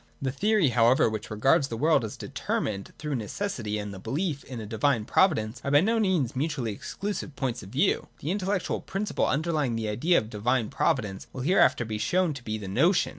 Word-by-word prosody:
The 135 -1 -1
theory 200 +2 +2
however 120 +1 +4
which 110 -1 -5
regards 135 +6 +3
the 115 - -5
world 155 +1 +3
as 110 - -5
deter - - -3
mined 100 -2 -4
through 150 -1 -4
necessity 115 - -3
and 105 -1 -5
the 95 - -8
belief 150 - -2
in 125 -3 -7
a 110 - -6
divine 110 +2 +1
provi 190 - +4
dence 110 +2 -5
are - - -2
by 145 +1 +6
no 225 +4 +2
means 180 - +1
mutually 135 -4 -1
excluding 200 - -4
points 125 -3 -2
of 95 - -11
view. - - +1
The 155 - -3
intellectual 195 -1 -1
principle 200 +1 -1
underlying 150 -4 0
the 110 -1 -2
idea 160 +12 +2
of 110 - -1
divine 115 +2 0
providence 105 -7 -1
will 130 - -6
hereafter 145 -5 +3
be 110 -1 -4
shown 170 - +1
to 135 -3 -9
be 110 -2 -3
the 105 -2 -7
notion. 160 - +3
130 Hz, 210 wpm, -27 LUFS, 110-165 Hz, -, by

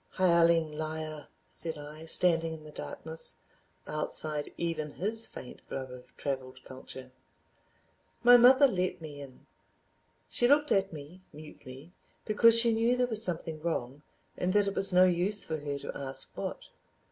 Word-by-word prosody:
"Hireling 170 -3 +3
Liar," 155 0 -5 0.2
said 160 -2 -5
I, 150 +2 -10
standing 165 -1 +3
in 155 -1 -10
the 155 - -12
darkness, 160 +1 -7 0.5
outside 150 0 -2
even 160 -3 -3
his 220 +4 -3
faint 125 - -11
glow 135 -1 -4
of 125 0 -15
traveled 130 -2 -5
culture... 130 0 -10 1.1
My 245 +1 +8
mother 260 +4 +7
let 185 -6 -2
me 150 -3 -9
in. 135 -2 -13 0.8
She 240 - +1
looked 295 +2 +3
at 195 0 +2
me, 155 +4 -11
mutely, 150 0 -12 0.3
because 230 +2 +6
she 230 0 +4
knew 230 +3 +1
there 250 - +2
was 220 -3 -2
something 165 -4 -3
wrong 145 -4 -3 0.3
and 180 +1 -1
that 205 -1 +3
it 200 - -2
was 195 - +6
no 180 0 +6
use 185 +3 +1
for 160 - -4
her 145 -1 -4
to - - -7
ask 135 -1 -3
what. - - -6
165 Hz, 155 wpm, -30 LUFS, 150-195 Hz, 1.1 s, My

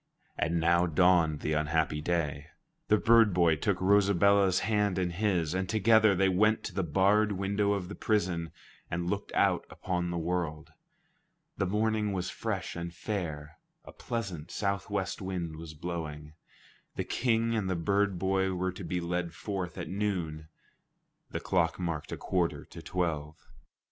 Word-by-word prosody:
And 85 +1 0
now 85 +2 +3
dawned 80 -2 +3
the 75 - -1
unhappy 75 0 0
day. 75 -3 -1 0.4
The 105 - +4
bird 115 -3 +5
boy 85 -3 +4
took 95 +4 0
Rosabella's 100 -1 +4
hand 105 -3 +1
in 90 -2 0
his, 90 -4 0
and 95 0 -2
together 110 -1 +4
they 95 +1 +3
went 105 +4 +3
to - - -5
the 95 - 0
barred 100 +6 +3
window 100 +1 0
of 95 -3 -3
the 105 - -7
prison 90 -8 -1 0.4
and 85 +1 -2
looked 100 0 -3
out - - +3
upon 90 -1 -3
the 85 - -2
world. 85 -2 -3 0.8
The 100 - -1
morning 105 +1 0
was 90 -1 -2
fresh 100 -5 -4
and 85 0 -5
fair; 80 -3 -5 0.3
a - - -10
pleasant 95 -9 -5
southwest 100 -1 -2
wind 90 -4 -4
was 80 -1 -9
blowing. 75 -2 -6 0.6
The - - -1
King 115 -2 +1
and 100 -4 -1
the 95 - 0
bird 100 +3 +1
boy 95 +1 +1
were 95 +1 -1
to 90 - -9
be 90 +1 -2
led 85 0 -3
forth 95 -5 -4
at - - -4
noon. 90 -6 -3 0.8
The - - -3
clock 85 -2 +1
marked 80 -4 -3
a - - -3
quarter 90 -3 -1
to - - -11
twelve. 80 -4 -2
90 Hz, 160 wpm, -30 LUFS, 85-100 Hz, 0.8 s, bird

